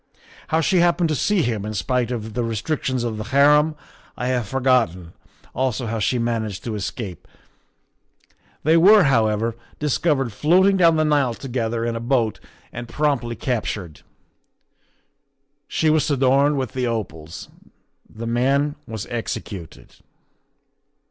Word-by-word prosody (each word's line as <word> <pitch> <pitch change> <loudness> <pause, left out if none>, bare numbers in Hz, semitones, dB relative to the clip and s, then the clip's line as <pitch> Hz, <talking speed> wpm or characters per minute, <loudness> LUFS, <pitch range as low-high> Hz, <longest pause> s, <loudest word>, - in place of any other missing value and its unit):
How 160 +2 +1
she 185 +3 +2
happened 170 -1 +2
to 155 - 0
see 195 +4 +1
him, 110 -5 -2
in 105 +1 -5
spite 125 +3 0
of 110 -3 -5
the 120 - -1
restrictions 125 +3 -2
of 115 -2 -3
the 105 - -5
harem, 150 +4 +4 0.4
I 125 - -2
have 125 -4 -1
forgotten, 120 -10 +1 0.4
also 130 -1 -1
how 115 0 -3
she 125 +4 +1
managed 115 -4 -2
to 115 - -4
escape. 100 -2 -6 1.4
They 160 +3 +4
were, 200 +4 +7
however, 115 -4 +1 0.2
discovered 145 -4 0
floating 185 - +4
down 170 -3 +5
the 155 0 +2
Nile 145 -6 +2
together 115 -3 -3
in 120 0 -2
a - - -3
boat 115 -2 0 0.3
and 120 0 -6
promptly 130 -4 -1
captured; 105 - -3 1.7
she 160 -1 +1
was 155 0 +2
adorned 140 +1 +3
with 130 -4 -2
the 125 -1 -2
opals. 80 -9 -5 0.6
The 115 +1 -8
man 135 +5 +1
was 110 -2 -5
executed." 100 - -6
125 Hz, 135 wpm, -22 LUFS, 110-145 Hz, 1.7 s, were